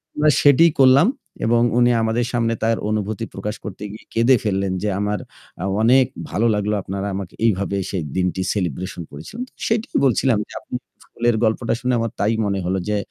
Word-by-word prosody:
আমরা 150 Hz, +1 st, +3 dB
সেটিই 150 Hz, +4 st, +6 dB
করলাম 135 Hz, +6 st, +6 dB, 0.4 s
এবং 115 Hz, +1 st, +3 dB, 0.2 s
উনি 120 Hz, 0 st, +5 dB
আমাদের 115 Hz, +2 st, 0 dB
সামনে 115 Hz, -1 st, +1 dB
তার 115 Hz, 0 st, +2 dB
অনুভূতি 110 Hz, +1 st, -2 dB
প্রকাশ 105 Hz, +2 st, -4 dB
করতে 100 Hz, 0 st, -7 dB
গিয়ে 110 Hz, -, -11 dB
কেঁদে 115 Hz, +3 st, +5 dB
ফেললেন 95 Hz, -2 st, 0 dB
যে 105 Hz, -, +1 dB
আমার 105 Hz, 0 st, -1 dB, 0.6 s
অনেক 130 Hz, +3 st, +5 dB, 0.2 s
ভালো 115 Hz, +3 st, +1 dB
লাগলো 105 Hz, +1 st, 0 dB
আপনারা 100 Hz, +1 st, -4 dB
আমাকে 95 Hz, -2 st, -6 dB
এইভাবে 100 Hz, -2 st, +1 dB
সেই 90 Hz, -5 st, -2 dB
দিনটি 90 Hz, 0 st, 0 dB
সেলিব্রেশন 90 Hz, -2 st, -3 dB
করেছিলেন। 140 Hz, -, -7 dB, 0.2 s
সেটাই 225 Hz, 0 st, 0 dB
বলছিলাম 125 Hz, -2 st, +3 dB
যে -, -, -13 dB
আপনি -, -, -8 dB, 0.3 s
ফুলের 120 Hz, -1 st, 0 dB
গল্পটা 110 Hz, +2 st, +1 dB
শুনে 125 Hz, 0 st, 0 dB
আমার 115 Hz, -1 st, -1 dB
তাই 105 Hz, +3 st, +2 dB
মনে 100 Hz, -1 st, -1 dB
হলো 95 Hz, +1 st, 0 dB
যে 105 Hz, -, +1 dB
110 Hz, 175 wpm, -21 LUFS, 100-120 Hz, 0.6 s, সেটিই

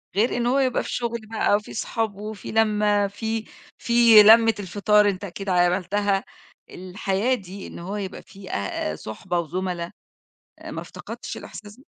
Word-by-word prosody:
غير 230 Hz, +4 st, +2 dB
إن 240 Hz, -, 0 dB
هو 265 Hz, +3 st, +2 dB
يبقى 260 Hz, -2 st, +1 dB
في -, -, -7 dB
شُغل 235 Hz, -1 st, -2 dB
بقى 215 Hz, -2 st, +2 dB
وفي 210 Hz, -, -4 dB
أصحاب 220 Hz, -1 st, -2 dB
وفي 210 Hz, +1 st, -7 dB
لَمّة، 210 Hz, -2 st, +2 dB
في 220 Hz, +2 st, -4 dB, 0.3 s
في 235 Hz, -3 st, +7 dB
لَمّة 225 Hz, +1 st, +7 dB
الفطار، 205 Hz, +2 st, +3 dB
أنت 190 Hz, 0 st, -4 dB
أكيد 195 Hz, +1 st, -6 dB
عملتها، 190 Hz, +3 st, +1 dB, 0.5 s
الحياة 195 Hz, +5 st, -2 dB
دي 195 Hz, -2 st, -9 dB
إن -, -, -10 dB
هو 190 Hz, +4 st, -5 dB
يبقى 195 Hz, -2 st, -5 dB
في 195 Hz, -1 st, -13 dB
أ 100 Hz, -5 st, -2 dB
أ -, -, -6 dB
صُحبة 175 Hz, -, -4 dB
وزُملا 175 Hz, +1 st, -3 dB, 0.7 s
آآ، -, -, -9 dB
ما -, -, -5 dB
افتقدتش -, -, -8 dB
الإحساس 210 Hz, 0 st, -10 dB
ده؟ 265 Hz, -, -19 dB
205 Hz, 165 wpm, -24 LUFS, 185-220 Hz, 0.7 s, في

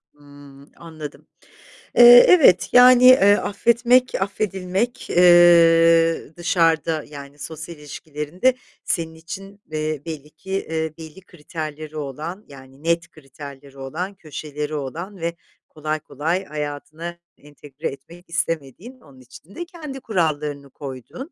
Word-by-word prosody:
Hımm, 145 Hz, -1 st, -17 dB
anladım. 160 Hz, -3 st, -10 dB, 0.7 s
Eee, 245 Hz, 0 st, +10 dB
evet, 265 Hz, -, +5 dB
yani, 250 Hz, 0 st, +7 dB
eee, 205 Hz, -6 st, +7 dB
affetmek, 235 Hz, +4 st, +2 dB
affedilmek, 195 Hz, +3 st, -3 dB
eee, 165 Hz, -2 st, +5 dB
dışarıda 165 Hz, -2 st, +1 dB
yani 140 Hz, 0 st, -11 dB
sosyal 160 Hz, +2 st, -8 dB
ilişkilerinde 150 Hz, -, -2 dB, 0.3 s
senin 160 Hz, -2 st, -3 dB
için, 195 Hz, +5 st, -10 dB
eee, 155 Hz, -1 st, -3 dB
belli 150 Hz, -3 st, -7 dB
ki, 190 Hz, -, -13 dB
eee, 160 Hz, -4 st, -3 dB
belli 160 Hz, +3 st, -12 dB
kriterleri 155 Hz, -2 st, -8 dB
olan, 155 Hz, +8 st, -6 dB
yani, 135 Hz, +1 st, -15 dB
net 170 Hz, 0 st, 0 dB
kriterleri 140 Hz, -1 st, -13 dB
olan, 160 Hz, +9 st, -5 dB
köşeleri 150 Hz, -2 st, -6 dB
olan 165 Hz, +8 st, -6 dB
ve 170 Hz, 0 st, -4 dB, 0.3 s
kolay 155 Hz, 0 st, -4 dB
kolay 165 Hz, +7 st, -3 dB
hayatına 150 Hz, +3 st, -6 dB, 0.2 s
entegre 145 Hz, +1 st, -9 dB
etmek 165 Hz, +7 st, -11 dB
istemediğin, 165 Hz, -, -4 dB
onun 135 Hz, -3 st, -19 dB
için 155 Hz, +9 st, -16 dB
de 345 Hz, -, -5 dB
kendi 305 Hz, -6 st, -9 dB
kurallarını 150 Hz, -, -2 dB
koyduğun, 140 Hz, -, -9 dB
160 Hz, 115 wpm, -21 LUFS, 145-185 Hz, 0.7 s, Eee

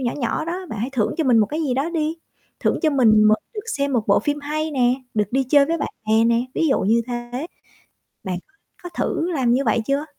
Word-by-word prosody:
nhỏ 240 Hz, -2 st, -1 dB
nhỏ 275 Hz, +3 st, -2 dB
đó, 360 Hz, +3 st, -4 dB
bạn 220 Hz, -, -5 dB
hãy 245 Hz, +5 st, -2 dB
thưởng 220 Hz, -5 st, 0 dB
cho 320 Hz, -, +1 dB
mình 245 Hz, -3 st, +4 dB
một 210 Hz, -, +4 dB
cái 310 Hz, +7 st, -3 dB
gì 260 Hz, -4 st, 0 dB
đó 285 Hz, +6 st, -1 dB
đi, 320 Hz, -1 st, -1 dB, 0.4 s
thưởng -, -, +1 dB
cho 310 Hz, -, +3 dB
mình 220 Hz, -6 st, +5 dB
m 215 Hz, -, +6 dB, 0.2 s
được 420 Hz, -, -3 dB, 0.2 s
xem 280 Hz, 0 st, 0 dB
một 230 Hz, -4 st, 0 dB
bộ 200 Hz, -, +4 dB
phim 290 Hz, 0 st, -2 dB
hay 310 Hz, +2 st, -3 dB
nè, 250 Hz, -3 st, +2 dB, 0.2 s
được 210 Hz, -2 st, +1 dB
đi 270 Hz, +1 st, +2 dB
chơi 280 Hz, +2 st, +4 dB
với 330 Hz, +1 st, -1 dB
bạn -, -, -2 dB, 0.2 s
bè 220 Hz, +1 st, +4 dB
nè, 235 Hz, +1 st, +2 dB
ví 325 Hz, -, +1 dB
dụ 270 Hz, -, +2 dB
như 230 Hz, +4 st, +2 dB
thế, 245 Hz, +4 st, -5 dB, 0.8 s
bạn 180 Hz, -2 st, -3 dB, 0.4 s
có 355 Hz, -, -6 dB
thử 340 Hz, 0 st, -2 dB
làm 255 Hz, -6 st, +1 dB
như 270 Hz, +2 st, +2 dB
vậy 225 Hz, +1 st, +2 dB
chưa? 280 Hz, +2 st, 0 dB
265 Hz, 245 wpm, -22 LUFS, 230-305 Hz, 0.8 s, m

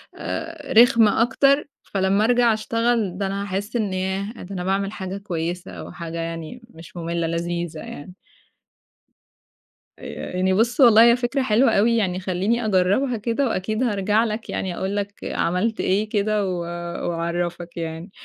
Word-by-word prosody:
آآ، 325 Hz, -2 st, -5 dB
رخمة 230 Hz, -2 st, +6 dB
أكتر، 275 Hz, +5 st, +3 dB, 0.2 s
فلمّا 195 Hz, +1 st, +1 dB
أرجَع 240 Hz, -1 st, +4 dB
أشتغل 230 Hz, -3 st, 0 dB
ده 200 Hz, 0 st, -1 dB
أنا 195 Hz, +1 st, -3 dB
هاحسّ 200 Hz, +3 st, -4 dB
إن 210 Hz, -5 st, 0 dB
ياه! 190 Hz, +3 st, -2 dB
ده 195 Hz, +2 st, -8 dB
أنا 180 Hz, -, -3 dB
باعمل 195 Hz, +1 st, 0 dB
حاجة 190 Hz, -1 st, -5 dB
كويسة 175 Hz, -2 st, -4 dB
أو -, -, -8 dB
حاجة 170 Hz, -1 st, -7 dB
يعني 165 Hz, +7 st, -5 dB
مش 165 Hz, -2 st, -13 dB
مملة، 170 Hz, 0 st, -2 dB
لذيذة 170 Hz, -1 st, -3 dB
يعني. 155 Hz, +3 st, -9 dB, 1.9 s
آآ -, -, -7 dB
يعني 185 Hz, +1 st, +2 dB
بُص 230 Hz, +7 st, +1 dB
والله 230 Hz, -3 st, +8 dB
هي -, -, +4 dB
فكرة 245 Hz, +2 st, -1 dB
حلوة 235 Hz, +1 st, +3 dB
أوي 225 Hz, +3 st, +3 dB
يعني 185 Hz, -4 st, 0 dB
خلّيني 195 Hz, +6 st, -1 dB
أجربها 210 Hz, +6 st, +2 dB
كده، 230 Hz, +5 st, 0 dB
وأكيد 215 Hz, +2 st, -1 dB
هارجَع 210 Hz, -1 st, +2 dB
لك 220 Hz, 0 st, -4 dB
يعني 185 Hz, -2 st, -3 dB
أقول 190 Hz, +2 st, -2 dB
لك 205 Hz, 0 st, -2 dB
عملت 180 Hz, +7 st, -1 dB
إيه 205 Hz, +3 st, +1 dB
كده 210 Hz, 0 st, +1 dB
و 180 Hz, -2 st, -2 dB, 0.5 s
وأعرّفك 170 Hz, +1 st, -3 dB
يعني. 165 Hz, +3 st, -5 dB
200 Hz, 155 wpm, -23 LUFS, 180-230 Hz, 1.9 s, والله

